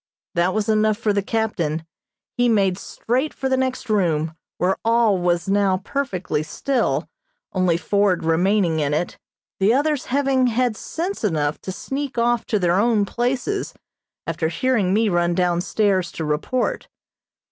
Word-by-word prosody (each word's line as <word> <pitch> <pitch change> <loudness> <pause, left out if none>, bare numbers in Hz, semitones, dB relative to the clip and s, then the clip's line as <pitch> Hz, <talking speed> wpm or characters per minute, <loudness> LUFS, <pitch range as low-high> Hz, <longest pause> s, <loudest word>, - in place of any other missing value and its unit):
That 175 +3 +1
was 215 -1 0
enough 215 -1 +2
for 210 -1 0
the 200 - +1
captain. 185 -8 -1 0.5
He 245 0 +2
made 195 -4 +2
straight 260 +6 -2
for 270 - -2
the 265 - +2
next 260 -1 -2
room, 165 -7 +1 0.2
where 185 +2 +1
all 230 -4 +3
was 175 +1 0
now 195 -1 +2
perfectly 190 - -2
still, 245 - -1 0.5
only 185 -3 +2
Ford 195 +1 +1
remaining 175 0 +2
in 145 -1 +1
it, 175 - -3 0.4
the 205 +5 +4
others 295 0 +1
having 265 -1 +2
had 245 -1 +1
sense 350 - -4
enough 155 -7 0
to 190 - -5
sneak 270 +6 -5
off 235 0 +1
to 215 - +1
their 180 -1 +2
own 220 -2 +3
places, 255 - -2 0.5
after 160 - -1
hearing 210 +1 +1
me 220 +3 +3
run 175 -2 +1
down 175 -1 +1
stairs 190 -3 +1
to 160 - -4
report. 155 +12 -1
205 Hz, 155 wpm, -22 LUFS, 175-245 Hz, 0.5 s, the